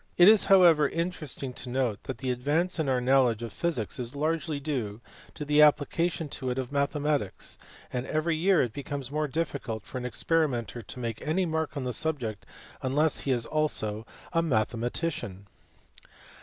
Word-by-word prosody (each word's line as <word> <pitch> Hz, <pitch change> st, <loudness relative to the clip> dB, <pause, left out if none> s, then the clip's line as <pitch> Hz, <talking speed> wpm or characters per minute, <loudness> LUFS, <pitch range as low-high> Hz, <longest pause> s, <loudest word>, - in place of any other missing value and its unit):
It 175 Hz, -, +8 dB
is 215 Hz, -1 st, +7 dB
however 170 Hz, -7 st, +6 dB
interesting 160 Hz, -6 st, -4 dB
to 125 Hz, -, -8 dB
note 125 Hz, -4 st, -1 dB
that 130 Hz, -, -4 dB
the 130 Hz, +1 st, -2 dB
advance 150 Hz, +9 st, 0 dB
in 150 Hz, -4 st, 0 dB
our 130 Hz, -1 st, +2 dB
knowledge 125 Hz, -3 st, +3 dB
of 115 Hz, -, -6 dB
physics 145 Hz, -, -2 dB
is 125 Hz, +2 st, -4 dB
largely 155 Hz, 0 st, -1 dB
due 125 Hz, -8 st, -3 dB, 0.4 s
to 150 Hz, -, -5 dB
the 150 Hz, +1 st, +4 dB
application 155 Hz, +3 st, +3 dB
to 130 Hz, -1 st, -3 dB
it 125 Hz, -, -2 dB
of 130 Hz, -1 st, -3 dB
mathematics, 145 Hz, -5 st, -1 dB, 0.3 s
and 125 Hz, +1 st, -2 dB
every 155 Hz, +2 st, 0 dB
year 180 Hz, +1 st, +3 dB
it 120 Hz, -4 st, -3 dB
becomes 140 Hz, -1 st, -5 dB
more 150 Hz, 0 st, 0 dB
difficult 135 Hz, -8 st, -3 dB
for 130 Hz, -, -5 dB
an 125 Hz, -, -6 dB
experimenter 125 Hz, -6 st, 0 dB
to 115 Hz, -, -9 dB
make 115 Hz, -2 st, -4 dB
any 165 Hz, +5 st, 0 dB
mark 160 Hz, -2 st, -2 dB
in 140 Hz, -, -2 dB
the 125 Hz, -1 st, -2 dB
subject 125 Hz, -11 st, -2 dB, 0.3 s
unless 145 Hz, +4 st, +2 dB
he 135 Hz, -, -2 dB
is 120 Hz, -2 st, +1 dB
also 115 Hz, -8 st, 0 dB, 0.3 s
a 165 Hz, -, +3 dB
mathematician. 115 Hz, -, -2 dB
140 Hz, 170 wpm, -28 LUFS, 125-160 Hz, 0.4 s, It